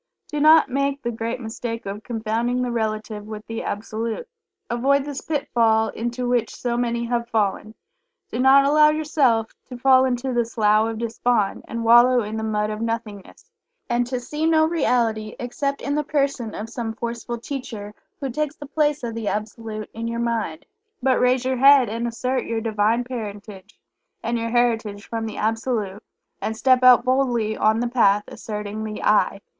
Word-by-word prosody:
Do 300 - -3
not 310 +2 +6
make 275 +1 -1
the 240 - -1
great 230 +2 -4
mistake 230 0 -5
of 200 +2 -5
confounding 235 +2 -1
the 245 - -2
Relative 215 -2 -3
with 215 0 -8
the 225 0 -5
Absolute. 220 - -4 0.4
Avoid 270 +4 +1
this 285 -2 -5
pitfall 230 -7 +1
into 240 +2 -3
which 240 -2 0
so 240 -1 -2
many 235 -1 -1
have 235 0 -2
fallen. 215 0 -1 0.6
Do - - -3
not 270 +2 +6
allow 300 +1 +6
yourself 290 -7 +1
to 250 - -8
fall 260 +1 +5
into 255 0 -1
the 240 0 +2
"Slough 215 -1 +2
of 225 - -5
Despond," 230 -2 0
and 230 0 -4
wallow 240 +1 +6
in 210 +1 -5
the 220 - -3
mud 210 -1 -1
of 215 +1 -5
"nothingness," 230 - -5 0.4
and 240 0 +1
to 250 0 -2
see 300 +6 -2
no 315 -1 +4
reality 230 -9 0
except 275 +3 -3
in 285 - -1
the 300 +1 0
person 275 -6 -1
of 215 - -5
some 230 -1 -5
forceful 235 +1 -4
teacher 230 -5 -6 0.3
who 275 -3 -3
takes 300 +3 -2
the 295 - -9
place 295 -1 0
of 235 -1 -3
the 225 -2 -4
Absolute 215 0 -4
in 230 +1 -4
your 230 0 -3
mind. 230 -9 -2 0.4
But 260 -1 +3
raise 250 0 +2
your 260 0 0
head 275 -1 +6
and 230 +2 -2
assert 255 +3 -2
your 230 -1 -2
Divine 220 +1 +1
Parentage, 210 -5 -8 0.4
and 230 +1 -1
your 230 0 -2
Heritage 225 -4 0
from 225 -1 -3
the 220 - -7
Absolute, 220 -2 -2 0.4
and 220 - -3
step 255 +1 +4
out 250 -1 +7
boldly 245 -4 +1
on 215 +1 +2
the 240 - 0
Path, 210 -4 +3
asserting 210 0 -6
the 215 -1 -5
"I." 205 -1 +2
235 Hz, 180 wpm, -23 LUFS, 220-255 Hz, 0.6 s, out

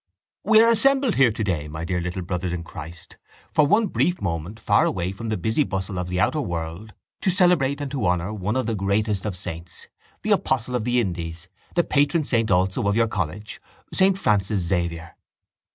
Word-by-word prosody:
—We 220 +1 +6
are 230 - +5
assembled 265 +2 +4
here 130 -4 +4
today, 95 -10 -2
my 80 +2 -6
dear 90 0 -1
little 90 +1 -4
brothers 90 0 -3
in 85 -1 -4
Christ, 85 +1 -10 0.4
for 150 -2 +4
one 215 +7 +4
brief 180 -2 0
moment 85 +3 -4
far 105 -1 +3
away 90 -1 -1
from 110 +3 -6
the 110 - -1
busy 110 - 0
bustle 95 -5 -3
of 90 0 -4
the 90 0 -1
outer 150 - +2
world 85 - -5 0.3
to - - +1
celebrate 175 -7 +3
and 145 -2 -4
to 130 -9 -1
honour 90 +3 0
one 105 +2 -2
of 130 - 0
the 115 - -1
greatest 100 0 0
of 100 - -3
saints, 85 -1 -5 0.3
the - - -1
apostle 125 -1 +1
of 115 -3 -1
the 125 0 +2
Indies, 85 -4 -4 0.3
the 175 - +4
patron 145 +2 +2
saint 115 -5 0
also 95 +1 +1
of 100 - +2
your 115 0 +3
college, 100 +1 -4 0.3
saint 190 0 +3
Francis 100 - +1
Xavier. 85 -2 -2
100 Hz, 195 wpm, -23 LUFS, 90-130 Hz, 0.4 s, We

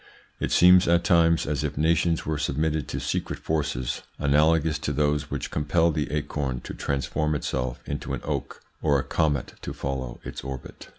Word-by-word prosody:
It - - -2
seems 90 +1 +7
at 85 0 +4
times 85 -1 +4
as 75 0 -1
if 75 -2 -3
nations 80 +2 +2
were 80 -1 -1
submitted 75 0 0
to - - -3
secret - - -2
forces 70 -6 -2 0.2
analogous 75 +2 +3
to 75 - -2
those 75 0 0
which 70 - -4
compel 80 +3 +2
the 75 -1 -2
acorn 75 -4 -2
to - - -7
transform 70 +3 -1
itself 65 -3 -2
into 70 - -3
an - - -8
oak - - -4 0.2
or 75 -2 +3
a 65 - -1
comet 75 -4 0
to - - -5
follow 65 -3 -4
its - - -7
orbit. 65 -1 -8
75 Hz, 175 wpm, -26 LUFS, 70-80 Hz, 0.2 s, seems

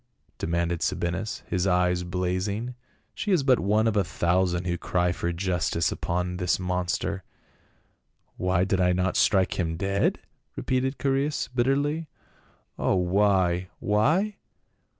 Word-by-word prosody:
demanded 85 0 -1
Sabinus, 90 +3 -2
his 90 +1 0
eyes 90 -1 +2
blazing. 95 +6 -2 0.2
" - - -41
She 210 - -3
is 175 -7 +3
but 130 -2 +4
one 105 +3 +2
out - - +4
of 105 - -1
a 100 - +4
thousand 90 +1 0
who 90 -1 0
cry 90 0 0
for 85 -1 -2
justice 85 -2 0
upon 90 +1 -2
this 90 -1 +1
monster." 90 +1 -2 1.1
"Why 90 -1 +1
did 95 0 +1
I 90 0 +3
not 90 0 0
strike 95 -2 +2
him 80 -2 -1
dead?" 100 +1 +1 0.4
repeated 130 +1 -1
Chae 135 - 0
reas 140 +2 -1
bitterly. 145 +6 +1 0.7
"O - - +2
why 90 -1 +2
— - - -40
why? 155 - +1
95 Hz, 145 wpm, -26 LUFS, 90-105 Hz, 1.1 s, but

